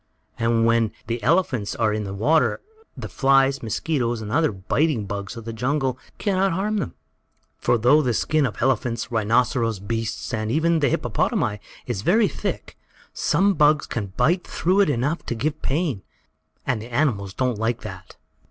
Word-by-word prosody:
And 115 0 +2
when 115 -2 +3
the 115 +1 -3
elephants 130 - +1
are 110 -2 +1
in 105 -1 -2
the 95 - -5
water 150 +10 +2 0.4
the - - -5
flies, 135 0 +3
mosquitoes 120 +1 -1
and 105 -1 -6
other 155 +3 +2
biting 110 - 0
bugs 100 +3 -5
of 115 - -8
the 115 - -5
jungle 130 +2 -1 0.2
can 200 -3 0
not 190 -1 +2
harm 210 +4 -1
them. 85 - -3 0.6
For, - - +2
though 125 +7 +5
the 125 -5 0
skin 155 +3 +1
of 110 - -8
elephants, 120 -3 0
rhinoceros 115 0 +1
beasts, 115 +4 -4
and 110 -1 -2
even 160 +5 +2
the 140 -3 +2
hippopotami, 105 -3 0 0.3
is 115 -6 -3
very 210 - +3
thick, - - -5 0.3
some 200 +1 +2
bugs 150 -2 +3
can 110 -4 -4
bite 175 +3 +2
through 185 +4 +1
it 200 - +4
enough 145 +5 -1
to 120 - -2
give 150 +6 -2
pain, 140 - -1 0.6
and 120 -4 -1
the 115 - -9
animals 110 -8 0
don't 125 -4 -1
like 115 +1 -1
that. 95 -5 -10
120 Hz, 170 wpm, -23 LUFS, 110-155 Hz, 0.6 s, though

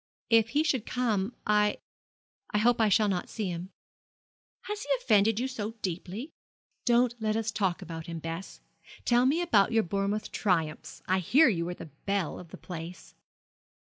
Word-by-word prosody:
'If 230 0 +5
he 305 - +4
should 265 -8 0
come 225 -3 0
I 210 0 +3 0.7
I - - 0
hope 235 +2 +3
I 220 - +4
shall 210 +1 +4
not 185 -3 -1
see 210 -5 -3
him.' 175 +1 -5 0.9
'Has 420 0 -4
he 285 - -8
offended 220 -2 +3
you 255 - 0
so 225 -4 -5
deeply?' 190 - -4 0.5
'Don't 240 0 +4
let 215 -1 0
us 225 0 -1
talk 195 -5 -1
about 160 -1 -7
him, 165 -1 -5
Bess. 165 +3 -6 0.4
Tell 245 +1 +4
me 290 +5 +3
all 350 - +1
about 210 - +4
your 225 -1 +4
Bournemouth 200 +3 -2
triumphs. 165 -6 -1
I 185 +1 +2
hear 265 - +5
you 170 -6 -1
were 175 - -4
the 160 - -10 0.2
belle 195 -5 -1
of 180 - -10
the - - -11
place.' 175 0 -8
210 Hz, 175 wpm, -29 LUFS, 180-235 Hz, 0.9 s, If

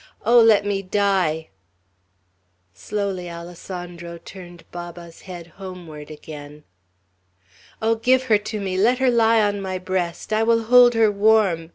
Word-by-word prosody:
"Oh, 240 +2 +6
let 220 -3 +5
me 200 -1 -1
die!" 185 -5 0 1.2
Slowly 195 - -4
Alessandro 175 0 -8
turned 175 -1 -12
Baba's 175 -1 -9
head 175 -2 -8 0.2
homeward 170 -6 -9
again. 150 -1 -11 1.2
"Oh, 225 +1 +3
give 255 +3 +2
her 220 -5 +3
to 215 +1 -5
me! 190 -2 -3
Let 240 +5 +3
her 260 -1 +2
lie 225 -1 +4
on 205 -1 -1
my 190 -1 -3
breast! 185 +2 -3
I 215 - +2
will 230 0 +2
hold 245 +1 +6
her 220 -2 +4
warm!" 200 -6 +2
195 Hz, 140 wpm, -22 LUFS, 175-220 Hz, 1.2 s, Oh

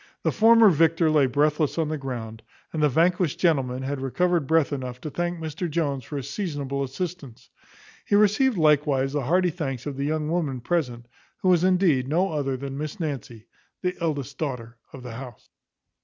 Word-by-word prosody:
The - - +2
former 225 -1 +6
victor 165 0 +3
lay 145 -3 +4
breathless 150 +4 +1
on 160 -2 0
the 155 - -1
ground, 115 -5 -6 0.3
and 160 - -2
the 150 - +4
vanquished 170 +2 +2
gentleman 135 -7 +1
had 135 0 -3
recovered 170 +3 0
breath 160 -2 +2
enough 125 -2 -5
to 155 - -6
thank 175 +2 -2
Mr 160 +2 -4
Jones 145 -4 -1
for 145 +6 -6
his 135 - -5
seasonable 145 -8 -3
assistance; 140 -2 -6 0.5
he 205 - +1
received 210 +4 +3
likewise 145 -4 +2
the 145 - 0
hearty 180 +4 +2
thanks 135 -7 -4
of 145 -2 -5
the 140 - -1
young 155 0 -1
woman 155 -6 -1
present, 125 -5 -2 0.4
who 185 - +3
was 175 -2 +4
indeed 180 -8 +3
no 175 +6 +1
other 140 -4 -1
than 135 +1 -6
Miss 155 +6 -5
Nancy, 135 -8 -5 0.4
the 180 0 0
eldest 145 -4 -3
daughter 120 -6 -5
of 130 - -10
the 120 -2 -7
house. 120 -2 -10
150 Hz, 185 wpm, -25 LUFS, 135-170 Hz, 0.5 s, former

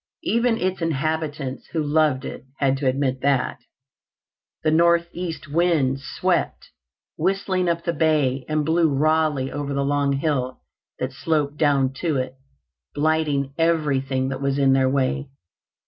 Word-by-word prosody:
Even 235 0 +2
its 185 -2 -2
inhabitants, 155 -3 -2
who 160 -2 0
loved 145 -3 +2
it, - - -7
had 135 -1 +2
to 135 -1 -1
admit 130 0 0
that. 140 -2 +1 1.0
The 155 - +2
northeast 170 0 +1
winds 145 -4 +1
swept - - -1 0.5
whistling 185 +1 0
up 170 0 -1
the 170 - -1
bay 150 -6 +1
and 155 -1 0
blew 165 +1 +3
rawly 150 -1 +1
over 145 -1 -3
the 140 0 0
long 140 0 +1
hill 135 -3 -1 0.4
that 130 +1 -3
sloped 145 +1 -1
down 140 -4 +2
to 160 -5 0
it, 130 0 -2 0.6
blighting 145 -2 +1
everything 135 -5 +1
that 135 - -4
was 140 0 0
in 135 -1 +4
their 130 -1 +3
way. 140 +1 0
145 Hz, 140 wpm, -23 LUFS, 135-160 Hz, 1.0 s, in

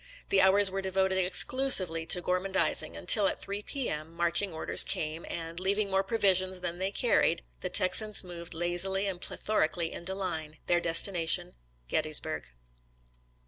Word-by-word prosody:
The 195 - +3
hours 190 +1 +4
were 195 0 -4
devoted 190 0 -1
exclusively 185 -3 +4
to 175 +1 +2
gormandizing 185 +2 -2
until, 210 -4 +4
at - - -2
3 200 +1 -4
P. 270 +3 -5
M., 155 +1 -5
marching 170 +3 0
orders 160 - +3
came, 155 +1 -4
and, 165 0 -6
leaving 200 +2 -2
more 190 0 +1
provisions 190 -3 0
than 175 0 -5
they 190 +1 -2
carried, 200 -5 0 0.2
the 180 - -5
Texans 205 +4 +3
moved 170 -2 -8
lazily 175 +3 -1
and 185 -3 -4
plethorically 170 -5 -2
into 190 +3 -5
line 160 -5 -5
— - - -39
their 175 - +1
destination, 175 +1 +1 0.3
Gettysburg. 155 - 0
185 Hz, 150 wpm, -28 LUFS, 170-195 Hz, 0.3 s, hours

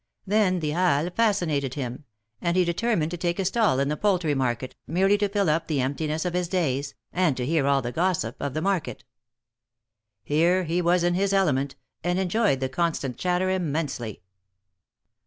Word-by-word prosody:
Then 195 -3 +2
the 150 -1 -1
Halles 175 -1 +1
fascinated 170 - +1
him, 130 0 -5 0.4
and 170 +1 0
he 180 - +4
determined 170 -2 0
to 175 - -4
take 170 0 -1
a 195 - -1
stall 205 - +2
in 140 - +1
the 150 - 0
poultry 180 -4 +1
market, 130 -2 -2
merely 190 +5 +3
to 205 -1 +1
fill 200 -1 +1
up 155 +2 +1
the 150 -4 0
emptiness 150 +5 -1
of 180 - -1
his 180 -1 0
days, 140 -6 -1 0.2
and 175 -7 +2
to 125 - -2
hear 150 -1 +1
all 140 -1 +2
the 120 - -3
gossip 165 -7 0
of 140 -1 -3
the 155 - -1
market. 175 - -1 1.2
Here 170 +5 +2
he 170 +2 0
was 175 0 +2
in 175 0 +2
his 195 +2 +1
element, 140 -8 +1 0.3
and 175 +1 0
enjoyed 190 - +1
the 130 - +1
constant 140 -3 -1
chatter 180 +1 0
immensely. 145 - -3
170 Hz, 180 wpm, -25 LUFS, 140-185 Hz, 1.2 s, he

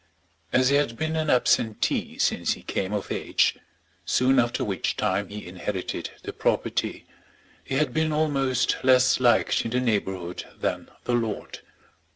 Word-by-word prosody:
As 130 0 +4
he 140 - +4
had 120 -6 0
been 155 0 -1
an 155 -1 0
absentee 115 -4 +1
since - - +1
he - - -11
came 95 0 -2
of 105 -2 -3
age, - - +1 0.4
soon 130 +1 +3
after 120 0 +1
which 100 -2 -2
time 100 0 0
he 105 +1 -7
inherited 90 +1 -4
the - - -6
property, - - -1 0.6
he 135 - -4
had 140 -3 +1
been 160 0 +1
almost 135 -5 +1
less 130 -1 +5
liked 120 -2 +3
in - - -3
the 125 +2 0
neighbourhood 95 -7 -2 0.2
than - - -2
the 125 - -1
lord. 115 -3 -2
125 Hz, 155 wpm, -25 LUFS, 105-135 Hz, 0.6 s, less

